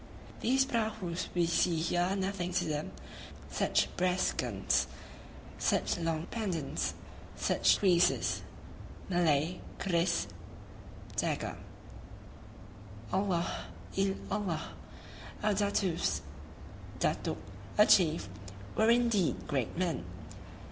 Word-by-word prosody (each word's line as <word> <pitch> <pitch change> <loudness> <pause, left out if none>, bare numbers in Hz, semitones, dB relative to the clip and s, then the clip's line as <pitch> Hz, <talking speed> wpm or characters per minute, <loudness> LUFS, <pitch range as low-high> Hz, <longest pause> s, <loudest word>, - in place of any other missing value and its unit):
These 265 +2 +3
prahus 215 -8 -2
we 175 -1 +3
see 170 +1 +2
here 170 +2 +1
are 185 +2 +1
nothing 190 -2 -2
to 185 - +1
them, 150 -1 -2 0.6
such - - +2
brass 180 +1 +2
guns, - - +1 0.7
such - - +2
long 165 -1 -1
pendants, 190 -10 -2 0.4
such - - +3
creeses 180 -2 +3 0.7
[Malay 170 -1 +2 0.2
kris, 170 -2 +1 0.9
dagger]! - - -1 1.6
Allah 190 -3 0 0.3
il 195 0 +2 0.2
Allah! 195 -6 -2 0.7
Our 210 0 +3
Datoos 200 -3 +1 0.8
[datuk, - - 0 0.4
a 210 - +8
chief] 165 - +4 0.5
were 220 +1 +4
indeed 235 -6 +2
great 135 -5 -1
men! 180 -3 0
180 Hz, 95 wpm, -32 LUFS, 170-200 Hz, 1.6 s, a